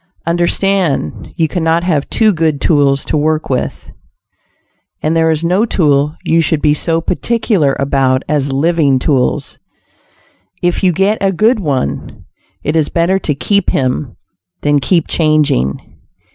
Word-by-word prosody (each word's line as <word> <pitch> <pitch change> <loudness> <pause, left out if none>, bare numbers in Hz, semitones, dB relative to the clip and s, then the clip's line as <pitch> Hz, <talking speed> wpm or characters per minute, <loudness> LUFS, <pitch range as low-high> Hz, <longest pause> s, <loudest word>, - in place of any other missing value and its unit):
Understand, 175 0 -1
you 165 -2 +2
cannot 165 0 0
have 155 -6 -1
too 220 -2 +2
good 160 -3 0
tools 140 -3 +2
to - - -2
work 155 0 -1
with, 125 - -3 1.1
and 155 +2 0
there 165 0 +2
is 160 0 0
no 180 +5 +2
tool 150 -8 +1
you 165 +1 +2
should 160 -1 0
be 150 0 +2
so 165 +2 -1
particular 195 - 0
about 135 -1 +1
as 140 -2 0
living 145 -1 +2
tools. 130 0 -1 1.0
If 175 +1 0
you 185 - +4
get 195 +5 +1
a 195 -1 +2
good 220 +6 +2
one, 135 - -3 0.4
it 150 - -1
is 155 -2 +1
better 175 +3 +1
to 150 -6 -2
keep 200 +6 0
him, 130 -1 -2 0.4
than 145 0 +2
keep 165 +3 +1
changing. 150 - 0
160 Hz, 145 wpm, -14 LUFS, 140-175 Hz, 1.1 s, you